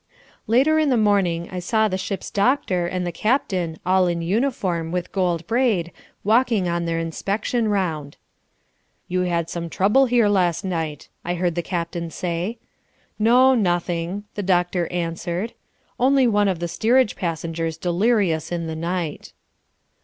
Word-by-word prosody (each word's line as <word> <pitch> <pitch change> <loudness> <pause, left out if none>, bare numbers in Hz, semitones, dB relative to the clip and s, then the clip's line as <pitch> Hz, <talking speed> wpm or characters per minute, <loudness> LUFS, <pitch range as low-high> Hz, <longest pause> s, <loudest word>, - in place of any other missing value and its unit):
Later 275 +8 +4
in 305 -2 +2
the 255 - +3
morning 195 -6 +2
I 185 - -4
saw 220 +5 +1
the 185 - -2
ship's 190 +1 -4
doctor 200 -6 +1
and 180 0 -2
the 175 - -2
captain, 185 - 0
all 185 0 +3
in 170 -1 -1
uniform, 185 -5 -1
with 180 -1 -3
gold 175 -4 0
braid, 225 -7 +1 0.3
walking 225 -3 +2
on 170 0 -1
their 165 0 -1
inspection 200 +8 -1
round. 165 -8 -2 0.9
"You 180 0 0
had 170 -1 0
some 170 0 -5
trouble 210 +11 +3
here 240 -3 +3
last 185 -4 +1
night," 160 -5 -3 0.2
I 175 +1 -2
heard 175 -1 0
the 175 - -1
captain 170 -1 -3
say. 175 +7 -3 0.6
"No, 250 +4 +5
nothing," 175 -2 -1
the 205 - -3
doctor 180 -2 +1
answered, 175 +4 -3 0.5
"only 265 +1 +4
one 205 -3 +3
of 190 -3 0
the 170 +1 -3
steerage 220 +8 +2
passengers 165 -1 -3
delirious 180 -2 +1
in 170 -1 -2
the 160 0 -4
night." 170 -1 -4
180 Hz, 150 wpm, -22 LUFS, 170-215 Hz, 0.9 s, No